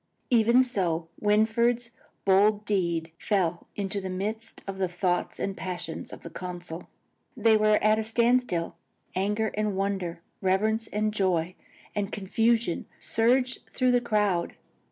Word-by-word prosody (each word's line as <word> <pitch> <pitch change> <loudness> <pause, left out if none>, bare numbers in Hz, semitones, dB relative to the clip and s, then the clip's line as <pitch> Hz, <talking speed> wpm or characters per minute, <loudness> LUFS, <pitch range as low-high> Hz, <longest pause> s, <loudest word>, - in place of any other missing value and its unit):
Even 235 +2 +5
so 175 -9 -1
Winfried's 230 +3 +2 0.3
bold 205 +2 +4
deed 170 -5 0
fell 175 -5 0
into 200 0 -2
the 190 - -4
midst 215 +5 -4
of 195 -1 -6
the 190 - +2
thoughts 175 0 -1
and 195 - -2
passions 175 -3 -5
of - - -10
the 170 - -8
council. 175 -1 -7 0.5
They 225 -1 +5
were 215 0 +4
at 215 +1 +4
a - - 0
standstill. 235 -5 +1 0.4
Anger 210 +3 0
and 210 -1 -1
wonder, 190 -4 -2 0.2
reverence 215 +4 +1
and 215 0 -1
joy 185 -4 +1 0.4
and 205 0 -2
confusion 225 0 +1
surged 250 +3 +2
through 255 -1 +2
the 245 0 +3
crowd. 210 -7 0
205 Hz, 135 wpm, -27 LUFS, 185-220 Hz, 0.5 s, Even